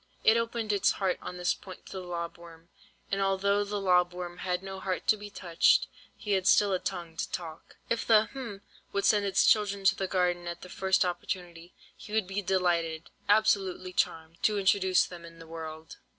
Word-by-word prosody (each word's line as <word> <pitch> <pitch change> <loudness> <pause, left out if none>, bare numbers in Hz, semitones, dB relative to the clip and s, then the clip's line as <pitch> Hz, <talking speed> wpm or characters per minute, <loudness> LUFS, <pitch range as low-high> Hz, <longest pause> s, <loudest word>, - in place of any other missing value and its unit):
It 220 - +6
opened 230 -2 -1
its 200 0 +3
heart 190 -2 -1
on 180 - -7
this 180 0 +1
point 185 -1 -12
to - - -12
the 190 - -5
lob 170 -2 -5
worm, 170 0 -15 0.4
and 195 0 0
although 200 +1 +2
the 205 0 -3
lob 180 -2 +3
worm 175 0 -7
had 180 0 -2
no 190 0 -6
heart 185 -1 -3
to - - +6
be 205 0 -9
touched, 175 -4 +3 0.3
he 210 - -5
had 190 -1 +2
still 205 -1 +5
a 185 - +1
tongue 175 -4 -5
to - - -2
talk. 160 -3 -7
"If 230 - -1
the—hm—would 215 -3 0
send 205 -2 +4
its 195 - +3
children 200 -2 +3
to 195 0 +5
the 190 - -2
garden 180 -2 0
at 175 - -5
the 180 - -10
first 190 +1 +2
opportunity, 175 -1 -5 0.2
he 210 - -11
would 220 -2 +2
be 195 +2 -3
delighted, 175 -4 0 0.2
absolutely 200 -3 +2
charmed, 165 -1 -2
to 210 -1 +2
introduce 190 -1 +3
them 175 -1 -10
in 165 0 -12
the 165 - -12
world. 160 -1 -8
185 Hz, 195 wpm, -29 LUFS, 175-200 Hz, 0.4 s, It